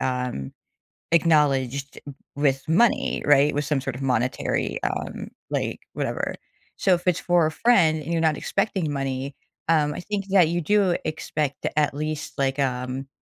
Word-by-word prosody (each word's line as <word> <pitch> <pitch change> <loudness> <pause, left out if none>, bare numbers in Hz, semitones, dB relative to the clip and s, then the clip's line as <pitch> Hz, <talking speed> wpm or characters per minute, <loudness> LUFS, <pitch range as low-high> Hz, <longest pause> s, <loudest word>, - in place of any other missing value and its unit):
um, 125 - -2 0.6
acknowledged 140 -5 +2 0.4
with 140 -2 +1
money, 220 +8 +2
right? 145 0 +5
With 145 0 0
some 145 -3 0
sort 135 -2 -4
of 135 - -7
monetary, 130 -1 0
um, - - -3 0.2
like, - - -2
whatever. - - -2 0.4
So, 190 - +3
if 175 +1 -2
it's 180 - +3
for 175 -2 +3
a - - -3
friend 160 -9 +3
and 155 - -6
you're 165 -1 +1
not 155 -2 +2
expecting 195 -6 -1
money, 135 0 -3 0.3
um, 150 -3 +3
I - - -6
think 200 +1 -3
that 190 -4 +5
you 175 +1 0
do 190 +1 +2
expect, 155 -2 -3
at 150 -2 +2
least, 155 +1 -4
like, 135 0 0
um, 130 0 -2
150 Hz, 160 wpm, -24 LUFS, 135-170 Hz, 0.6 s, right